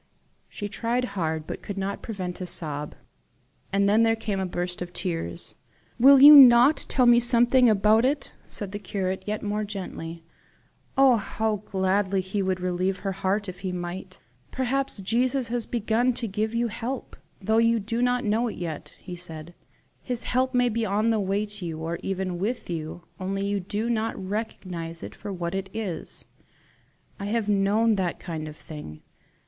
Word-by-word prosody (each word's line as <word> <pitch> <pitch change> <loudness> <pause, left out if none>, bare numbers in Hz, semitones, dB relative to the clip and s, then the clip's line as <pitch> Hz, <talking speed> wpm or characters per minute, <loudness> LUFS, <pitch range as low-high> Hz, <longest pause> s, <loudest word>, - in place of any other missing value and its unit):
She 205 - -5
tried 235 +4 -1
hard, 160 -4 -2
but - - -6
could 200 - -6
not 195 +1 -3
prevent 185 -5 -5
a 180 - -4
sob. 150 -4 -1 0.8
And 200 0 +2
then 215 +3 +4
came 210 -3 -3
a 190 - -1
burst 175 0 -3
of 175 0 -6
tears. 165 - -3 0.5
"Will 270 +3 +8
you 295 +2 +11
not 260 +1 +8
tell 255 - +3
me 240 0 +7
something 240 +1 +4
about 215 +2 +4
it?" 275 +2 0 0.2
said 200 -3 -3
the 205 - -5
curate, 190 -2 -3
yet 210 +1 -3
more 210 +1 -1
gently. 175 -5 -6 0.7
Oh, 265 -3 +6
how 220 +1 -1
gladly 190 0 +1 0.2
would 190 -1 0
he 180 - -9
relieve 185 +1 0
her 195 - -2
heart 195 +2 -1
if 185 -1 -7
he 185 -1 -3
might! 180 +1 -6 0.3
"Perhaps 260 -3 -1
Jesus 245 +5 +1
has 240 -1 0
begun 235 +2 +1
to 235 -1 -2
give 215 +3 -2
you 235 0 +1
help, 240 +4 -5 0.2
though 220 +3 +2
you 230 0 +3
do 230 +3 -2
not 245 0 +1
know 220 +3 +1
it 225 - -5
yet," 165 -4 -6
he 180 - -8
said, 165 -1 -7 0.5
"His 245 -2 -3
help 255 +1 0
may 245 0 +3
be 230 0 -1
on 215 +2 +1
the 220 - +1
way 200 +1 0
to 205 -2 -5
you, 165 -2 -4
or 165 +2 -4
even 185 -2 -3
with 215 0 -3
you, 160 +1 -5 0.2
only 195 +1 -2
you 200 0 0
do 205 +4 -3
not 225 -1 -1
recognize 185 -5 -5
it - - -7
for 205 - -7
what 175 -2 -4
it 195 0 -3
is. 205 -7 -5 0.9
I 200 - -4
have 215 +1 -1
known 210 +2 +2
that 180 -3 -1
kind 160 -3 -5
of 150 0 -9
thing. 150 - -10
205 Hz, 180 wpm, -26 LUFS, 185-230 Hz, 0.9 s, you